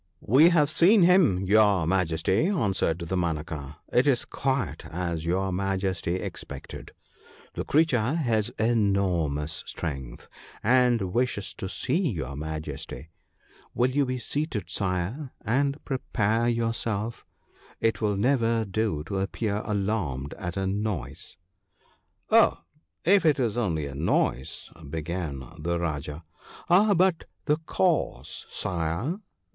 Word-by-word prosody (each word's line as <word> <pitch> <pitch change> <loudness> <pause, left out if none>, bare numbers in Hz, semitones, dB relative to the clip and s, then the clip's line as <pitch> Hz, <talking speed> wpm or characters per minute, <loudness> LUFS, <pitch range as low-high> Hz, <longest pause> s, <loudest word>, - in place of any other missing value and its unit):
'We 140 - +6
have 155 -4 +3
seen 185 +5 +6
him, 170 - +4
your 100 -3 +4
Majesty/ 90 - +1
answered 100 - +1
Dama 85 -2 0
naka; 75 -3 -7
' - - -25
it 125 +4 +4
is 130 -4 +2
quite 135 -2 -2
as 85 -1 -3
your 95 +2 0
Majesty 95 -2 -1
expected 95 - -7 0.3
— - - -24
the - - -3
creature 140 -4 +2
has 115 -8 +1
enormous 95 -9 +1
strength, 70 -6 -5 0.4
and 120 -5 +3
wishes 120 -5 0
to 95 - -5
see 165 - 0
your 70 -5 -4
Majesty. 75 0 -6 0.6
Will 125 +2 +2
you 140 0 +1
be 130 0 -1
seated, 120 - -3
Sire, 100 - -2
and 140 +4 +1
prepare 115 -3 0
yourself 115 -1 -2 0.3
— - - -27
it 115 0 +1
will 105 -2 +1
never 115 -1 +2
do 100 -6 -1
to 95 +5 -3
appear 100 +2 -1
alarmed 95 - -2
at 90 +1 -4
a 95 - 0
noise.' 100 - -3 0.5
' - - -40
Oh, - - +5 0.4
if 195 +2 +5
it 155 -4 +3
was 115 -4 0
only 85 -11 0
a 70 - -6
noise,' 70 -3 -1 0.2
began 80 -3 -4 0.2
the 85 +3 -1
Rajah. 75 -1 -3 0.3
' - - -18
Ah, 200 +3 +6
but 180 -1 +2 0.2
the 150 - +2
cause, 180 -4 0
Sire 90 - -2
100 Hz, 130 wpm, -27 LUFS, 85-125 Hz, 0.6 s, We